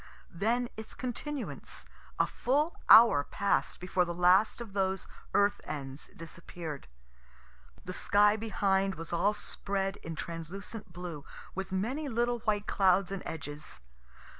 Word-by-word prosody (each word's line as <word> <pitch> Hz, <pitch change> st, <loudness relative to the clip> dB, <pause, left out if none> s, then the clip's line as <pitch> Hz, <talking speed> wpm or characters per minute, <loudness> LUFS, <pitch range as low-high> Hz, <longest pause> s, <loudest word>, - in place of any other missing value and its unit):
Then 230 Hz, +7 st, +1 dB
its 220 Hz, 0 st, -8 dB
continuance: 260 Hz, +3 st, -4 dB, 0.3 s
a -, -, +4 dB
full 295 Hz, +6 st, 0 dB
hour 220 Hz, -11 st, +9 dB
pass'd 200 Hz, +6 st, 0 dB
before 180 Hz, 0 st, +1 dB
the 175 Hz, -1 st, -4 dB
last 180 Hz, +6 st, +4 dB
of 230 Hz, -4 st, -8 dB
those 190 Hz, -1 st, 0 dB, 0.3 s
earth 200 Hz, 0 st, +3 dB
ends 135 Hz, -1 st, -6 dB
disappear'd. 165 Hz, -2 st, -8 dB, 1.0 s
The 185 Hz, -, -5 dB
sky 205 Hz, +2 st, +4 dB
behind 195 Hz, -3 st, +1 dB
was 165 Hz, +1 st, -7 dB
all 200 Hz, +5 st, +3 dB
spread 195 Hz, -1 st, -2 dB
in 165 Hz, 0 st, -7 dB
translucent 175 Hz, +6 st, -6 dB
blue, 170 Hz, -4 st, -6 dB, 0.3 s
with 190 Hz, 0 st, -4 dB
many 255 Hz, +11 st, -1 dB
little 240 Hz, 0 st, +1 dB
white 210 Hz, -2 st, 0 dB
clouds 190 Hz, -1 st, +3 dB
and 195 Hz, -, -3 dB
edges. 145 Hz, -1 st, -5 dB
195 Hz, 130 wpm, -31 LUFS, 170-220 Hz, 1.0 s, hour